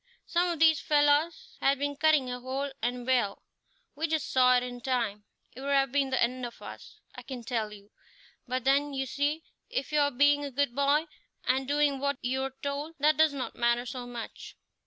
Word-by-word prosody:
Some 350 +1 +1
of 340 - -2
these 320 -2 +5
fellows 295 +2 +1
had 275 +1 +3
been 285 +1 -2
cutting 295 -4 +3
a 250 - -4
hole, 265 +3 -3
and 245 +1 -2
well, 245 -6 +1 0.5
we 315 +3 -2
just 315 -2 -2
saw 255 -1 +5
it 245 - 0
in 245 -1 -7
time. 230 -5 -1 0.3
It 260 - -9
would 280 - -4
have 270 -2 +2
been 275 -1 +1
the 260 - 0
end 250 +2 -1
of 240 -1 -6
us, - - -11 0.2
I - - -9
can 255 -3 -8
tell 225 -3 -2
you; 205 0 -14 0.6
but 255 0 -2
then, 280 +2 +2
you 270 0 -1
see, 290 +5 -1 0.3
if 270 +2 -3
you 300 - +2
are 285 -1 +4
being 290 +2 +3
a 285 - -3
good 275 -1 0
boy 285 +3 +2 0.4
and 260 +1 0
doing 290 -1 +2
what 280 0 -1
you're 265 +2 -2
told, 285 +3 -3
that 300 +2 +3
does 315 -2 +4
not 260 - -4
matter 240 +1 +1
so 250 0 -6
much." 240 -2 -8
270 Hz, 205 wpm, -29 LUFS, 250-290 Hz, 0.6 s, these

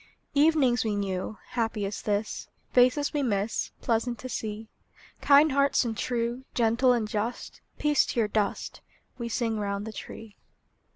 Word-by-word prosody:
Evenings 285 -5 +4
we 215 -2 -1
knew, 195 +1 -3
Happy 225 -3 -1
as 200 +1 -4
this; 210 +1 -2 0.3
Faces 255 +4 +4
we 295 - 0
miss, 210 -4 -1
Pleasant 235 +1 0
to 255 - -7
see. 220 -1 -4 0.5
Kind 290 +2 +6
hearts 280 -1 +3
and 225 -1 -2
true, 240 +2 -2
Gentle 235 +2 +3
and 235 -3 +1
just, 215 +3 -4 0.2
Peace 295 -1 +3
to - - -2
your 220 - +3
dust! 210 -1 -2 0.4
We 235 0 -3
sing 225 -1 -1
round 200 0 -2
the 220 - -6
tree. 215 +1 -9
230 Hz, 155 wpm, -27 LUFS, 210-255 Hz, 0.5 s, Kind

